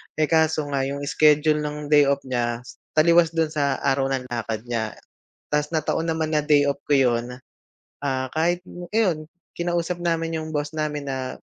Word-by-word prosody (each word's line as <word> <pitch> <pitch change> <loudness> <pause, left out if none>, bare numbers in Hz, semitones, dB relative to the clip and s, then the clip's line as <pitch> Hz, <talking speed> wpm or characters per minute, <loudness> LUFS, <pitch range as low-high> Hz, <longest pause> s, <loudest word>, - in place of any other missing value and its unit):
eh, 155 -1 +1
kaso 160 -1 +3
nga 135 -1 0
yung 140 +1 -4
schedule 150 +1 +3
ng 150 0 -4
day 145 -1 +7
off 140 0 +1
niya 120 -2 -1 0.4
taliwas 165 +1 +5
do'n 160 -1 +1
sa 140 -3 0
araw 135 -1 +2
ng 130 -1 -2
lakad 115 -2 -3
niya 110 -2 -2 0.6
tapos 150 +1 0
na-taon 160 +1 0
naman 160 -1 -2
na 150 - +1
day 145 -2 +4
off 140 - -4
ko 145 - +3
'yon, 120 -3 +2 0.8
ah, 130 -1 -1
kahit 175 +3 0 0.3
iyon 175 -9 +1 0.3
kinausap 175 0 -1
namin 165 -1 -1
yung 155 0 -6
boss 150 +1 -2
namin 150 -2 -3
na, 130 -1 -4
150 Hz, 170 wpm, -23 LUFS, 135-160 Hz, 0.8 s, day